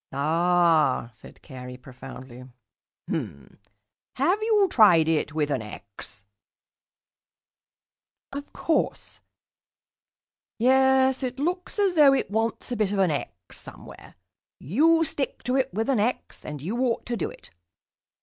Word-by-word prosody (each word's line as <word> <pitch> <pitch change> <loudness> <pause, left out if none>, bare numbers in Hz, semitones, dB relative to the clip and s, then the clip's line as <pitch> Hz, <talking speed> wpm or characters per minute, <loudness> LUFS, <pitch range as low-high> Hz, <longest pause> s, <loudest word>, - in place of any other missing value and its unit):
"Ah," 160 -3 +2
said 110 - -17
Carey 125 -2 -9
profoundly. 130 0 -11 0.6
"H'm. 70 -1 -6 0.6
Have 350 +11 +1
you 430 -3 +3
tried 180 - +5
it 155 -1 0
with 150 -2 0
an 130 - -1
'x'?" 100 -1 -10 2.1
"Of 285 +1 -7
course." 325 - -2 1.4
"Yes, 265 +2 +3
it 255 -1 -4
looks 355 +8 -3
as 400 -3 +2
though 295 -4 +6
it 200 - -2
wants 225 +3 -2
a - - -1
bit 210 -3 0
of 205 - -1
an 190 -4 +3
'x' 95 -10 -6
somewhere. - - -13 0.4
You 320 - +3
stick 280 -2 -4
to 250 +2 -1
it 265 -1 +1
with 220 +5 -2
an 265 -5 +1
'x' 235 +5 -2
and 150 -2 -7
you 215 +9 -3
ought 250 -3 0
to 240 - -3
do 200 - -3
it. - - -15
215 Hz, 130 wpm, -25 LUFS, -, 2.1 s, though